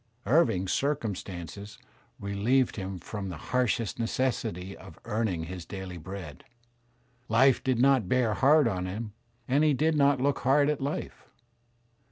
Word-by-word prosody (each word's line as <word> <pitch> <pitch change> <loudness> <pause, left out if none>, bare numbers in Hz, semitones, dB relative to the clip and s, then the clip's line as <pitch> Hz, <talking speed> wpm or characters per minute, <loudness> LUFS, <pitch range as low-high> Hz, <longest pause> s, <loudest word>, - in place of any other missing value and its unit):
Living's 100 - +2
circumstances 100 - -3 0.4
relieved 105 +6 +1
him 95 -2 -5
from 95 +2 -6
the 85 - -6
harshest 120 -1 -1
necessity 115 -6 -2
of 95 -4 -13
earning 110 -7 -1
his 90 +1 -6
daily 95 0 -7
bread. 85 -4 -8 0.9
Life 125 +3 +4
did 130 -2 +1
not 130 -6 +3
bear 125 -4 +2
hard 140 +6 +5
on 90 -4 -2
him 105 +3 -5 0.3
and 140 +4 +3
he 150 -2 +4
did 155 +4 +2
not 140 -2 +4
look 140 +2 +1
hard 145 +3 +3
at 150 - -4
life. 140 +3 -5
110 Hz, 140 wpm, -28 LUFS, 95-135 Hz, 0.9 s, hard